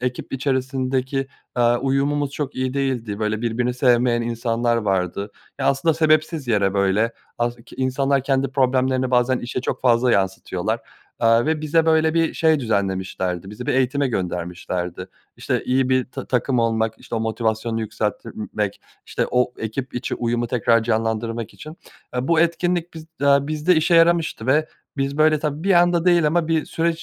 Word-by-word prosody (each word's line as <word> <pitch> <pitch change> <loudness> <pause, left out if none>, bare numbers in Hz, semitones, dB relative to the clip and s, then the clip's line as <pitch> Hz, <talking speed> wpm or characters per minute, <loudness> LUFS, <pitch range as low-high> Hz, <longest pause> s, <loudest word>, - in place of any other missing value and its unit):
ekip 125 0 -4
içerisindeki, 130 0 -1 0.3
aaa, 120 -1 +3
uyumumuz 140 +2 0
çok 145 0 -4
iyi 130 0 -2
değildi, 125 -7 -2
böyle, 110 +1 -1
birbirini 120 +2 -1
sevmeyen 120 -1 +3
insanlar 115 0 0
vardı. 100 -1 -1 0.3
E, 135 - -4
aslında 140 +4 +2
sebepsiz 155 -2 +1
yere, 100 -3 +2
böyle, 100 +4 +2 0.3
as 120 0 -1
ki 115 - -16
insanlar 135 +1 +1
kendi 135 -1 +1
problemlerini 130 -1 +1
bazen 125 +1 +2
işe 125 +1 -4
çok - - -3
fazla 125 -1 +3
yansıtıyorlar, 95 -1 -1 0.4
aaa, 115 +1 +3
ve 160 -1 0
bize, 160 +2 +2
böyle, 160 0 +3
bir 165 -1 +1
şey 160 -3 +3
düzenlemişlerdi, 95 -4 -2
bizi 110 +4 -8
bir - - +1
eğitime 135 +2 +1
göndermişlerdi. 90 -2 -4 0.3
İşte, - - -2
iyi 130 0 +1
bir 130 0 +1
ta - - -7
takım 125 0 0
olmak, 115 -1 +1
işte, - - -8
o 115 - -1
motivasyonu 110 0 -1
yükseltmek, 105 -1 -3 0.3
işte, - - -1
o 125 0 +1
ekip 125 +4 -5
içi 125 +1 -3
uyumu 120 0 -1
tekrar 115 -1 +2
canlandırmak 115 0 -2
için. - - -21 0.5
Aaa, 125 +3 -2
bu 165 -1 +4
etkinlik 175 0 0
biz 160 0 -9 0.2
aaa, 140 0 +4
bizde 155 +3 +2
işe 160 +3 +2
yaramıştı 165 -7 +3
ve 155 +4 +3 0.3
biz, 140 +2 -2
böyle, 155 0 +4
tabii 150 +2 -3
bir 195 - +3
anda 175 0 +4
değil 175 -3 +4
ama 165 +1 +1
bir 160 -1 +1
süreç 165 0 -1
125 Hz, 165 wpm, -22 LUFS, 115-145 Hz, 0.5 s, bu